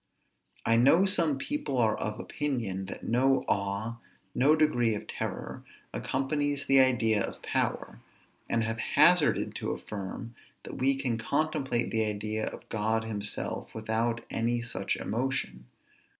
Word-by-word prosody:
I 115 - +4
know 140 +10 +5
some 170 -7 +2
people 290 - -3
are 110 -3 +3
of 105 +1 -4
opinion, 115 -10 -2
that - - -8
no 130 +3 +2
awe, 100 +4 -1 0.4
no 140 +5 +4
degree 120 -8 +2
of - - -6
terror, - - -5 0.3
accompanies 145 +1 -1
the 135 0 +5
idea 120 -5 +3
of - - -7
power; - - -1 0.5
and 115 - +1
have 115 0 -2
hazarded 155 +7 +4
to - - -3
affirm, 105 +3 -6 0.3
that - - -8
we 135 +1 +3
can 125 -4 -1
contemplate 140 -2 0
the 110 -1 +2
idea 105 +1 -2
of - - -6
God 110 +1 0
himself 105 -2 -3
without 115 +1 -1
any 120 +1 0
such 115 - -2
emotion. 115 - -2
120 Hz, 135 wpm, -29 LUFS, 110-135 Hz, 0.5 s, know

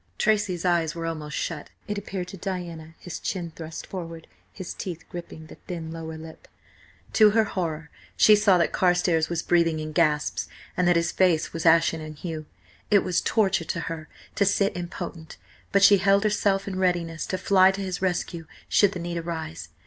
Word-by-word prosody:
Tracy's 205 -5 +1
eyes 170 -3 +1
were 165 -1 -4
almost 155 -2 -4
shut, 160 -4 -4 0.2
it 210 - -2
appeared 195 -3 -5
to 195 - -8
Diana, 170 -4 -6
his 175 -2 -7
chin 175 -4 -3
thrust 160 -1 -7
forward, 165 -3 -7 0.3
his 185 -3 -7
teeth 170 -3 -6
gripping 170 -2 -8
the - - -13
thin 165 -3 -5
lower 160 -1 -6
lip. 160 0 -11 0.7
To 215 -2 +7
her 220 +1 +3
horror 165 -7 -4 0.3
she 215 - +7
saw 205 -3 +4
that 170 - +1
Carstares 175 -3 +2
was 170 -1 -2
breathing 165 -2 +2
in 155 0 -5
gasps, 150 -2 +1 0.3
and 180 - +2
that 175 - +5
his 170 0 +1
face 175 -4 +2
was 165 0 -1
ashen 165 0 +4
in 155 0 -8
hue. 155 -1 -6 0.4
It 200 -2 +5
was 180 -1 +1
torture 195 -6 +1
to 170 - -3
her 160 -1 -6 0.2
to - - +2
sit 200 0 +2
impotent, 175 -2 -6 0.3
but 200 0 +4
she 200 +1 +8
held 200 +2 +4
herself 200 -2 +1
in 190 -1 -3
readiness 175 -3 0
to 185 - -2
fly 190 0 +5
to 195 +1 -2
his 185 -2 -4
rescue 175 -3 -2 0.2
should 205 -1 +4
the 180 - -5
need 170 0 -4
arise. 160 - -5
175 Hz, 185 wpm, -25 LUFS, 160-190 Hz, 0.7 s, she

